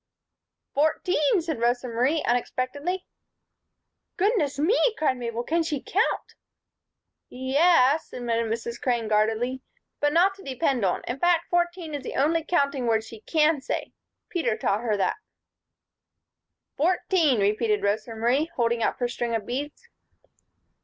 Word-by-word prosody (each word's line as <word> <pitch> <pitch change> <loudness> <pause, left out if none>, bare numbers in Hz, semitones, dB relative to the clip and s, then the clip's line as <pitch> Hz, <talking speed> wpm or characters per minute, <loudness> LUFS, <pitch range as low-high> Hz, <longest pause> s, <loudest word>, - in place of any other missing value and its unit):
"Fourteen," 310 +3 +2
said 320 -6 -4
Rosa 245 +1 +1
Marie, 255 +7 +1
unexpectedly. 285 +9 -2 1.1
"Goodness 365 - +1
me!" 325 - +2 0.2
cried 285 -5 +1
Mabel. 235 -1 -3
"Can 335 +6 +1
she 315 -3 -2
count?" 390 - -1 1.0
"Ye 260 +1 -5
es," 310 -2 +4
admitted 230 -2 -2
Mrs. 235 +1 -4
Crane, 240 -3 0
guardedly, 220 +4 +1 0.4
"but 290 0 +2
not 360 +5 +4
to 390 0 -15
depend 265 -3 -1
on. 185 - 0
In 250 +3 -4
fact, 345 0 +2
fourteen 345 -2 0
is 290 - -3
the - - -6
only 320 +4 +2
counting 280 -6 0
word 220 -1 +2
she 225 0 -11
can 310 +1 +2
say. - - -4 0.3
Peter 325 - -1
taught 205 +3 0
her 220 -3 0
that." 195 - 0 1.6
"Fourteen," 330 - +2
repeated 210 +1 +1
Rosa 215 +3 -1
Marie, 250 +8 +1
holding 235 -1 +1
up - - 0
her 245 - 0
string 240 -1 -2
of 215 -3 -3
beads. 290 - -5
265 Hz, 140 wpm, -25 LUFS, 235-320 Hz, 1.6 s, es